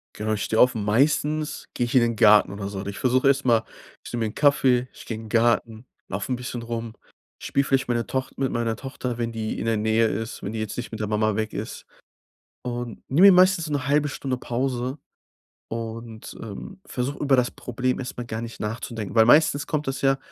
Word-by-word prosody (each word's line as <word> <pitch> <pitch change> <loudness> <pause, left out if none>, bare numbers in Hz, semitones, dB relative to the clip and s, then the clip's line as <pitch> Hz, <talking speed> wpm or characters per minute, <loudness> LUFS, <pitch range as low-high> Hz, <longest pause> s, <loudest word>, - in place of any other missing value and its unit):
Genau, 110 0 -2
ich 105 - -1
stehe 110 - +1
auf 125 -1 +6
und 105 -2 -3
meistens 150 +7 +1
gehe 120 - 0
ich 120 - -4
in 130 - +7
den 115 -1 +1
Garten 105 -1 +6
oder 100 -1 -5
so 100 -1 -6
und 100 +1 -5
ich 100 - -6
versuche 130 +1 +3
erst 140 0 +2
mal 115 -3 +4 0.4
ich - - -9
nehme 115 -2 -1
mir - - -3
'n - - -15
Kaffee, 130 -4 +3
ich - - -13
gehe 115 - -4
in 110 - -9
'n - - -10
Garten, 115 0 +1 0.2
laufe 130 - -3
'n - - +1
bisschen 125 -1 -5
rum, 115 -1 -5 0.5
spiele 140 - 0
vielleicht 135 -2 +1
meiner 120 -1 0
Toch 130 0 -2
mit 135 -1 0
meiner 115 -1 -1
Tochter, 125 -2 -5
wenn 115 -1 -2
die 110 -1 -3
in - - -3
der 115 -1 +2
Nähe 110 +1 +2
ist, 110 +2 -4
wenn 100 - -4
die 110 - -4
jetzt 110 - -4
nicht 120 - -5
mit 110 -1 -7
der 105 - -1
Mama 110 0 +1
weg 110 0 -2
ist, - - -6 0.8
und 120 -2 -5
nehme 175 +9 +7
mir 195 - +9
meistens 180 -3 +4
'ne 145 -1 -2
1/2 145 +1 +3
Stunde 130 -2 -3
Pause 125 +2 -2 0.7
und, 115 0 -7
ähm, 185 - -8
versuche, 130 +3 -3
über 140 -2 +4
das 125 -1 +1
Problem 125 +1 -2
erst 125 - -5
mal 120 - -4
gar 110 0 -4
nicht 115 0 -8
nachzudenken, 110 0 -5
weil 110 0 +7
meistens 145 +2 +4
kommt 150 -2 -2
das 135 - -3
ja, 135 0 +3
120 Hz, 230 wpm, -24 LUFS, 110-135 Hz, 0.8 s, mir